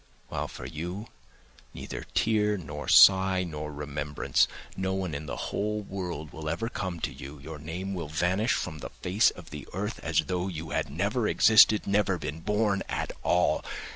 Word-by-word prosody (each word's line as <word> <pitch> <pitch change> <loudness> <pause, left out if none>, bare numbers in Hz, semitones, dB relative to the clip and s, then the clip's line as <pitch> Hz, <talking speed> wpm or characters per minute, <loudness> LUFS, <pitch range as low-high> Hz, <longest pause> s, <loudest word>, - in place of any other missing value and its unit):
While - - -2
for 65 - -9
you 90 - -5 0.7
neither - - -6
tear, 105 -2 +2
nor 75 -4 -7
sigh, 95 -1 +7
nor 75 -3 -5
remembrance; 75 0 0 0.3
no 95 0 -1
one 95 -4 -2
in 75 +1 -5
the - - -3 0.2
whole 105 +1 -1
world 90 -6 -5
will 80 -1 -5
ever 85 +8 -2
come 95 -7 -4
to 70 - -2
you, 70 +3 -9
your 75 +2 -9
name 90 +6 -5
will 85 -5 -4
vanish 90 - +1
from 80 - -3
the - - -6
face 95 +5 +2
of - - -12
the - - -8
earth—as 95 -5 0
though 90 +2 -2
you 80 -4 -6
had 75 - -1
never 100 - 0
existed, 110 -1 +6
never 100 -2 +2
been 80 -1 -5
born 105 +2 +1
at - - -2
all! - - +2
90 Hz, 170 wpm, -28 LUFS, 75-100 Hz, 0.7 s, sigh